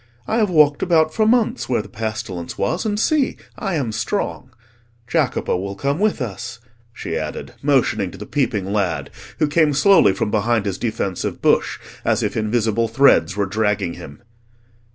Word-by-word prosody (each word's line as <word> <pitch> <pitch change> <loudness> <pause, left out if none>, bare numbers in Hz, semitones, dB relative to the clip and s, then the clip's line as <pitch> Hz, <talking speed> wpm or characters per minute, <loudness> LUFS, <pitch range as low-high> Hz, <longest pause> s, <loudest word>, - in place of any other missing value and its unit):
I 220 - 0
have 215 -3 +2
walked 150 -4 +4
about 160 -3 +3
for 215 -1 +2
months 240 - +1
where 120 -4 +1
the - - -12
pestilence 110 -4 -5
was, 100 - -1
and 205 -1 -1
see, 290 +3 +1 0.2
I 195 -4 -3
am 130 -7 -1
strong. 125 - -3 0.6
Jacopo - - 0
will 100 +2 -4
come 140 - -1
with 205 -9 +1
us," 120 +3 -6 0.3
she - - -5
added, - - -5
motioning 125 -9 +2
to - - -11
the - - -8
peeping 105 -9 -1
lad, 100 -5 -1 0.3
who - - +2
came 150 -1 +2
slowly 195 - +5
from 105 +2 -2
behind 110 0 +1
his 95 -2 -3
defensive 110 -5 -2
bush, - - +2 0.3
as - - +1
if - - -2
invisible 110 0 +1
threads 110 - +3
were 100 - +1
dragging 100 -3 0
him. 70 +3 -11
115 Hz, 170 wpm, -20 LUFS, 100-155 Hz, 0.6 s, slowly